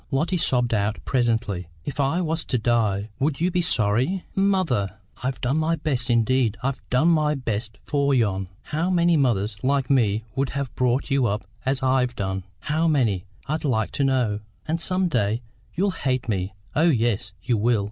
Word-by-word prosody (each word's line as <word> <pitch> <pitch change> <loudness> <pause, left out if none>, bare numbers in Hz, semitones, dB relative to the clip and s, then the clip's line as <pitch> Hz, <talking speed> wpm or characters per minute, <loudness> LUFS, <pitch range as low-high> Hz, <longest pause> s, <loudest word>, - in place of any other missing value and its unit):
Lotty 155 +6 0
sobbed 125 -7 +1
out 105 0 +1
presently. 115 - 0 0.2
"If 145 - -5
I 140 +6 +2
was 160 -1 -1
to 125 - 0
die, 110 -3 +1
would 140 +1 0
you 175 +3 +1
be 180 0 +1
sorry?" 125 - +1
"Mother!" 175 - +1 0.3
"I've 130 +1 -2
done 130 +5 +1
my 160 +1 +2
best, 140 -5 -1
indeed 120 -1 +2
I've 135 -1 -1
done 130 +7 +3
my 155 -2 +3
best 110 -4 -3
for 140 -1 +1
yon! 100 -7 +1
How 160 +4 -1
many 175 -2 +3
mothers 110 -8 +1
like 135 0 +1
me 110 -5 +2
would 135 0 0
have 135 -6 -3
brought 125 +4 0
you 135 -3 +3
up 105 +2 -2 0.2
as 135 -1 +1
I've 130 -1 +2
done? 95 -2 -3 0.2
How 155 +2 +1
many, 115 - +1 0.2
I'd 155 +2 -2
like 110 -7 0
to 140 - -1
know? 125 -6 +1 0.3
And 160 +1 -1
some 185 +1 +1
day 115 -5 0 0.3
you'll 195 +3 +2
hate 130 -7 -1
me; 95 -2 -2 0.2
oh 160 +4 +4
yes, 115 - +1
you 120 - +1
will! 115 +1 +2
130 Hz, 180 wpm, -24 LUFS, 110-150 Hz, 0.3 s, oh